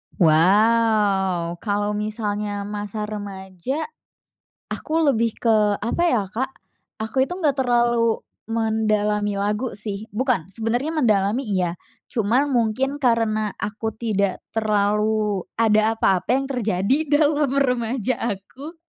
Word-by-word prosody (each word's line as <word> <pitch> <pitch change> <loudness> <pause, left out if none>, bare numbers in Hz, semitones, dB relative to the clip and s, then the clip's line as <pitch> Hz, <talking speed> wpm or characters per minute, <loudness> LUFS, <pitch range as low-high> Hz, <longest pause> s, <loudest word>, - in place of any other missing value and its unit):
Wow, 190 0 +3
kalo 205 0 -1
misalnya 210 -1 -3
masa 210 +1 -4
remaja 205 - -5 0.9
aku 310 - -6 0.2
lebih 230 -4 +2
ke, 235 - 0 0.3
apa 235 +10 -1
ya 225 -5 +2
Kak, 240 +7 -3 0.5
aku 225 +4 +1
itu 315 - -7
nggak 295 -6 +1
terlalu 235 -2 +2 0.3
mendalami 215 -2 +1
lagu 210 +5 -1
sih 210 0 -4
bukan, 215 - 0
sebenernya 235 +7 -1
mendalami 220 -5 +2
iya, 180 -2 +1 0.4
cuman 245 +6 +1
mungkin 255 +3 0
karena 225 -4 +1
aku 210 +2 -4
tidak 200 -4 -1
terlalu 210 -1 +1
ada 220 0 +3
apa-apa 190 -2 +1
yang 275 - -1
terjadi 220 -2 +1
dalam 295 -1 +3
remaja 250 -2 +1
aku, 240 - -5
215 Hz, 110 wpm, -22 LUFS, 205-240 Hz, 0.9 s, Wow